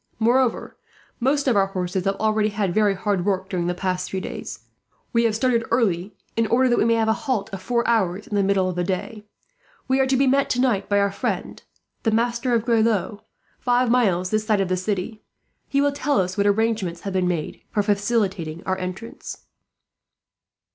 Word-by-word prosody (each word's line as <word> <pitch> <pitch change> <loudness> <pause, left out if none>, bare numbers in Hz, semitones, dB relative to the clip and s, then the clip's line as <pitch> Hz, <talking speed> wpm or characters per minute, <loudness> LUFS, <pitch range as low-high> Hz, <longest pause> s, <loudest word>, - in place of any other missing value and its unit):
Moreover, 240 +2 +1 0.4
most 275 +3 +1
of 250 - +3
our 195 -1 +3
horses 185 -1 -3
have 195 0 +1
already 215 0 +1
had 205 -3 -1
very 210 -1 +3
hard 195 -1 -1
work 190 -1 -1
during 175 -3 -1
the 180 - -1
past 185 0 -2
few 190 - -2
days. - - -7 0.5
We 235 0 +3
have 220 -2 +1
started 235 0 +1
early, 200 -5 0 0.2
in 230 -1 +1
order 255 +3 +3
that 240 - +2
we - - +3
may 230 0 +3
have 225 -1 +1
a 220 - +4
halt 225 -5 -2
of 190 - -5
four 235 +3 0
hours 200 -4 +1
in - - -10
the 205 - +3
middle 195 -1 +2
of 185 - -3
the 180 - 0
day. 200 +3 -4 0.6
We 265 +1 +2
are 265 - +3
to 265 0 +2
be 275 - +3
met 275 +1 +2
tonight 245 -6 +1
by 205 - +3
our 200 0 +2
friend, - - -3 0.4
the 225 - +1
Master 235 +2 +1
of 230 -1 0
Grelot, 220 -3 +1 0.4
five 245 -1 +2
miles 185 -7 +2
this 215 0 +1
side 215 -3 +3
of 195 -2 0
the 185 - +2
city. 200 +3 -3 0.5
He 280 - +1
will 285 0 +3
tell 285 -4 0
us 185 0 -1
what 200 0 +2
arrangements 205 -5 0
have 195 - -5
been 185 -1 +1
made 170 -4 -3
for 205 - 0
facilitating 200 -6 -1
our 190 0 -1
entrance." 185 +5 -7
210 Hz, 200 wpm, -23 LUFS, 190-235 Hz, 0.6 s, a